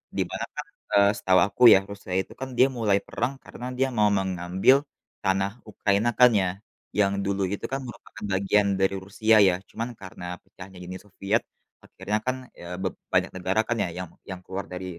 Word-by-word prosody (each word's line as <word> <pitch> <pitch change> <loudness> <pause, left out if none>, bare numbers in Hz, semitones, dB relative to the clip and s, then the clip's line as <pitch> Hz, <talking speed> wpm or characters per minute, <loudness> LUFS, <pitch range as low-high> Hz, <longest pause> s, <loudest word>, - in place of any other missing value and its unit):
Di - - +1
mana - - -3
Kak, - - -5 0.3
eee, 100 0 +6
setahu 95 0 +3
aku 125 - -2
ya - - +7
Rusia 100 -2 -7
itu - - -11
kan 130 0 -5
dia 130 +2 +6
mulai 110 -6 +1
perang 120 +3 -2
karena 120 - -9
dia 135 +1 +2
mau 105 0 +5
mengambil 95 +5 +3 0.5
tanah 95 +1 +1 0.2
Ukraina 100 +1 +1
kan 125 0 +9
ya, 95 - +1 0.5
yang 100 -1 +3
dulu 100 0 -1
itu 100 - -4
kan 135 0 -2
merupakan 110 -2 -11
bagian 100 +1 +2
dari 95 0 +2
Rusia 110 +3 +3
ya, 90 - +3
cuman 115 +2 -4
karena 95 -2 -9 0.2
pecahnya 95 0 -13
Uni 90 +1 -6
Soviet 105 +2 -1 0.4
akhirnya 105 +1 -3
kan 130 0 0 0.2
ya 90 +1 -7
beb 95 - -2 0.2
banyak - - +3
negara 95 +4 +1
kan 120 - 0
ya - - -2
yang 90 -1 -6 0.2
yang 95 -1 -5
keluar 95 +1 -5
dari, 90 +1 -5
100 Hz, 190 wpm, -26 LUFS, 95-110 Hz, 0.5 s, kan